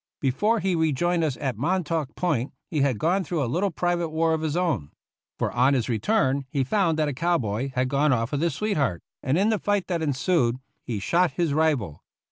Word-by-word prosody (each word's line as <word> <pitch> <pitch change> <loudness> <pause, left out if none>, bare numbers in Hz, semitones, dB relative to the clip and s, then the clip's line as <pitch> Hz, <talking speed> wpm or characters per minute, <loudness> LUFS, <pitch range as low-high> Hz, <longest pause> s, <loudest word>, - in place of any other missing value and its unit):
Before 205 - +1
he 190 -1 +1
rejoined 165 +2 +1
us 145 -5 -1
at 130 -7 -3
Montauk 165 -2 -1
Point 140 -8 -1 0.2
he 155 -4 0
had 135 -5 +2
gone 180 - +1
through 165 -2 -1
a - - 0
little 180 +12 0
private 175 -1 -1
war 160 +1 +1
of 160 - -1
his 160 0 -1
own; 165 - 0 0.5
for - - -1
on 130 +4 +3
his 125 -1 -1
return 135 - +1
he 140 -2 0
found 165 +2 +1
that 155 -1 +1
a 145 - -2
cow 170 +6 +1
boy 115 +2 -2
had 125 0 +1
gone 140 +3 +2
off 115 -1 0
with 145 -1 -1
his 165 -4 0
sweetheart, 145 - -1 0.2
and 135 +4 +1
in 200 +4 +3
the 215 -2 +1
fight 205 -1 0
that 170 -2 -1
ensued 140 -4 +1 0.2
he 115 - -4
shot 170 - +1
his 170 -5 0
rival. 145 - 0
155 Hz, 215 wpm, -25 LUFS, 130-175 Hz, 0.5 s, on